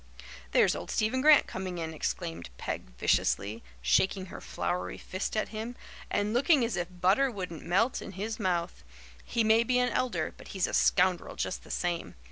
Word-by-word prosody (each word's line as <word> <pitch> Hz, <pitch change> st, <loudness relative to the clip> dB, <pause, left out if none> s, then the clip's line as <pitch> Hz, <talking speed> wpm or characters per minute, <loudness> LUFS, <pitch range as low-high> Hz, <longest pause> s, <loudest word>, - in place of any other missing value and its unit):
"There's -, -, +4 dB
old -, -, -6 dB
Stephen 220 Hz, +4 st, +1 dB
Grant 300 Hz, +1 st, +7 dB
coming 185 Hz, -1 st, -5 dB
in," 160 Hz, -1 st, -4 dB
exclaimed 85 Hz, -, -3 dB
Peg -, -, -4 dB
viciously, 105 Hz, -, +1 dB, 0.2 s
shaking 190 Hz, -, +2 dB
her -, -, -7 dB
floury 180 Hz, +1 st, -3 dB
fist 185 Hz, +3 st, -4 dB
at 215 Hz, -, 0 dB
him, 225 Hz, +3 st, -5 dB, 0.3 s
"and 205 Hz, +1 st, 0 dB
looking 270 Hz, +1 st, +4 dB
as 230 Hz, -4 st, -2 dB
if 175 Hz, 0 st, -2 dB
butter 185 Hz, +9 st, +2 dB
wouldn't 180 Hz, -8 st, -6 dB
melt 225 Hz, +9 st, +1 dB
in -, -, -8 dB
his 215 Hz, +5 st, -4 dB
mouth. 175 Hz, -, -1 dB, 0.4 s
He 235 Hz, -1 st, 0 dB
may 220 Hz, +1 st, +5 dB
be 250 Hz, +2 st, +1 dB
an 250 Hz, 0 st, +3 dB
elder, 185 Hz, -11 st, -1 dB
but -, -, -13 dB
he's 185 Hz, -, +3 dB
a -, -, -5 dB
scoundrel 185 Hz, -2 st, +3 dB
just -, -, -3 dB
the -, -, -15 dB
same. 175 Hz, -1 st, -2 dB
190 Hz, 180 wpm, -30 LUFS, 175-230 Hz, 0.4 s, Grant